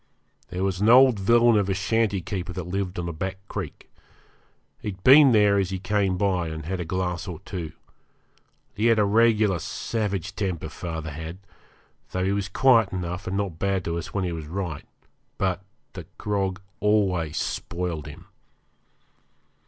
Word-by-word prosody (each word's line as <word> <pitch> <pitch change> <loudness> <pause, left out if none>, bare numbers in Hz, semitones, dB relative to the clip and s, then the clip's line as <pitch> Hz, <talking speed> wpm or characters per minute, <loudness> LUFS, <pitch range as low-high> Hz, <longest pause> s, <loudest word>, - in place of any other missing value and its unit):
There 90 +1 -3
was 95 -1 -1
an 105 - +4
old 125 -2 +7
villain 115 +3 +5
of 100 -1 -1
a 95 - +1
shanty 105 0 +1
keeper 90 0 -4
that 90 -1 -5
lived 95 0 -3
on 85 -1 -3
a 85 - -4
back 95 +4 -4
creek. - - -6 0.9
He'd 95 -3 -6
been 135 +1 +8
there 105 -3 +4
as 95 -2 0
he 95 - -3
came 95 0 0
by 90 -3 +1
and 80 -1 -6
had 95 +3 -3
a 90 - -3
glass 90 0 -2
or 90 -4 -5
two. 85 -5 -5 1.0
He 110 +3 +1
had 115 -1 +4
a 105 - +4
regular 105 -3 +3
savage 100 0 -3
temper, 90 -6 -3
father 80 -1 -5
had, 80 +4 -7 0.8
though 95 0 0
he 95 - +1
was 100 -1 -1
quiet 115 -5 +4
enough 90 +1 -4
and 95 +1 -1
not 95 -5 -3
bad 95 -2 0
to 85 0 -2
us 80 - -7
when 100 - -1
he 90 - -1
was 80 -3 -6
right. 85 -3 -5 0.5
But 95 -1 -1 0.3
the - - -9
grog 100 -2 -2 0.2
always 95 -7 +1
spoiled 85 -3 -3
him. 75 - -11
95 Hz, 170 wpm, -25 LUFS, 90-105 Hz, 1.0 s, been